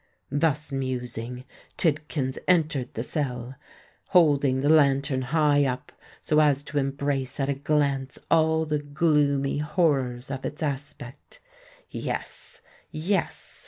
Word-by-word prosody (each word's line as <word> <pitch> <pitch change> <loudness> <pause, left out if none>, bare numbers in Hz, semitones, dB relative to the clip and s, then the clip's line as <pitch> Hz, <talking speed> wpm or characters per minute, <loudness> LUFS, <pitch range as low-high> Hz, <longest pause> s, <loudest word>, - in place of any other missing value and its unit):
Thus 150 0 0
musing, 125 -2 -4 0.3
Tidkins 150 -4 0
entered 155 -8 +2
the 115 - -2
cell, 125 -4 -3 0.5
holding 145 -7 +4
the 145 - +2
lantern 140 -3 +3
high 145 +1 +3
up 130 -1 -3 0.3
so 150 - +3
as 145 -2 +3
to 145 0 -2
embrace 135 -1 -2
at 135 0 0
a - - +2
glance 140 -1 0
all 160 0 +3
the 150 -1 -1
gloomy 145 -2 +1
horrors 135 -6 0
of 135 -1 -4
its 150 - -4
aspect. 140 -3 -6 0.5
"Yes—yes!" 180 +6 -4
140 Hz, 115 wpm, -26 LUFS, 135-150 Hz, 0.5 s, holding